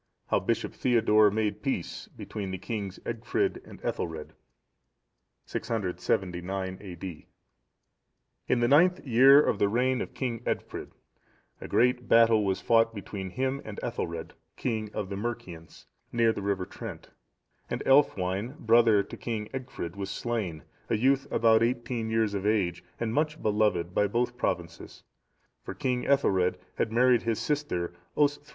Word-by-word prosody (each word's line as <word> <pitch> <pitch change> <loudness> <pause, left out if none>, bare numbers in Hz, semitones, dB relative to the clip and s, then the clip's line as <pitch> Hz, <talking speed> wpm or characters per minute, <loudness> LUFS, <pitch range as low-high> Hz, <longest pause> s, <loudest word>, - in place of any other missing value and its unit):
How - - +3
Bishop - - -1
Theodore 110 -4 +4
made 105 0 -1
peace 135 -11 -3
between 100 -3 -6
the 95 - -3
kings 100 -2 -5
Egfrid 115 0 -1
and - - -13
Ethelred. 80 -2 -3 1.1
[679 95 -3 -2
A.D.] 90 -4 -8 1.2
In 125 - +2
the 120 - +3
ninth 170 +7 +4
year 135 +3 +7
of 100 - 0
the 100 - +3
reign 125 +3 +1
of - - -6
King 120 -4 -2
Egfrid, 120 - -4 0.7
a - - -6
great 125 0 +2
battle(674) 115 -2 +6
was 95 -1 -1
fought 115 -1 +3
between 100 -2 -6
him 130 +6 -2
and 110 -2 -7
Ethelred, 85 -1 -4 0.2
king 110 -4 -2
of 95 - -4
the 100 - -4
Mercians, 95 -7 -6 0.3
near 115 -1 +3
the - - -5
river 100 -2 -1
Trent, - - -9 0.6
and - - -3
Aelfwine,(675) 115 -3 +2
brother 115 -2 +4
to - - -9
King 110 -3 -4
Egfrid, 125 -9 -5
was 100 -1 -4
slain, 100 - -3 0.3
a 115 - +2
youth 135 +4 +2
about 115 -1 +4
eighteen 120 -1 -1
years 110 -2 +1
of 100 0 -1
age, 90 -5 +1 0.2
and 115 -1 -1
much 150 +3 0
beloved 105 -5 +1
by 105 - +3
both 120 +4 -1
provinces; 85 -8 -4 0.6
for - - -7
King 125 -1 -1
Ethelred 95 -10 +2 0.2
had - - +1
married 125 +1 +4
his 115 -2 -1
sister 145 - -2 0.2
Osthryth. 145 0 +1
110 Hz, 145 wpm, -28 LUFS, 95-120 Hz, 1.2 s, year